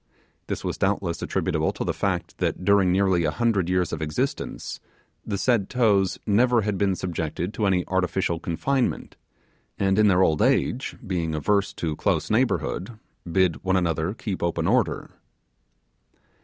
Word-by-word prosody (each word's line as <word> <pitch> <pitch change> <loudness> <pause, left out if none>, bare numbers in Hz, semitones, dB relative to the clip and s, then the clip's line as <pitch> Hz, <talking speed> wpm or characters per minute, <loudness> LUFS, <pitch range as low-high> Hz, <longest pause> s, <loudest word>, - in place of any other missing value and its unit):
This - - -4
was - - -3
doubtless 95 -4 0
attributable - - 0
to - - -4
the - - -1
fact, - - -2
that 90 - -1
during 100 -3 +4
nearly 95 -2 +2
a - - +2
hundred 110 -7 0
years 90 -1 0
of 80 - -3
existence 75 -1 -3 0.4
the 100 - -3
said 110 -2 +1
toes 105 -6 +2
never 120 +3 +3
had 105 -1 -1
been 95 0 +1
subjected 90 +2 -3
to 105 - 0
any 90 -2 +1
artificial 90 -2 0
confinement, 120 - -1 0.6
and 95 +1 +2
in 105 - +5
their 95 -1 +4
old 80 -4 +2
age, 130 +3 +1
being 85 -5 -2
averse 100 +6 +1
to 80 -3 -2
close - - 0
neighbourhood, 105 +5 0 0.3
bid 90 -6 +1
one 95 0 +1
another 85 +1 -1
keep 100 -4 -4
open 85 -1 -1
order. 120 +1 +1
95 Hz, 155 wpm, -24 LUFS, 85-105 Hz, 0.6 s, in